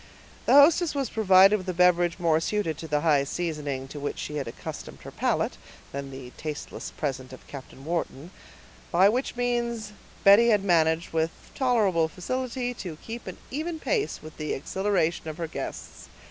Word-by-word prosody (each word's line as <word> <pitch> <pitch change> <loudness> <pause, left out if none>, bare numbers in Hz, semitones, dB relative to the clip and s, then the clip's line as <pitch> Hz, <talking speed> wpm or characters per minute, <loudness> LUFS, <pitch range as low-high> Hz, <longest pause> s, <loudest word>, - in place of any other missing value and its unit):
The - - +5
hostess 305 +3 +6
was 275 -5 -1
provided 195 -1 +6
with 185 -2 -7
a 180 - -2
beverage 175 -1 +3
more 165 -3 +2
suited 170 -2 -1
to 160 - -6
the 150 -1 0
high 145 -4 +3
seasoning 145 -4 -3
to 145 - -7
which 145 - -3
she 150 - -4
had 140 - -3
accustomed 115 - -8
her - - -9
palate, - - 0 0.3
than 140 0 -5
the 130 -2 -9
tasteless 155 -1 -6
present 130 -3 -4
of 130 - -12
Captain 135 0 -11
Wharton; 165 -1 -3 0.6
by 185 +3 +6
which 250 +4 -1
means 235 -3 -1 0.3
Betty 205 +4 +7
had 210 -3 +3
managed, 165 -3 +2
with 160 0 +2 0.2
tolerable 210 -11 +2
facility, 245 +8 -3
to 180 -9 -7
keep 230 +1 -7 0.2
even 320 +4 -3
pace 425 +5 -1
with 155 0 -11
the 155 -1 -2
exhilaraton 175 +1 -1
of 155 0 -5
her 170 - -2
guests. 160 - -7
175 Hz, 170 wpm, -26 LUFS, 155-225 Hz, 0.6 s, Betty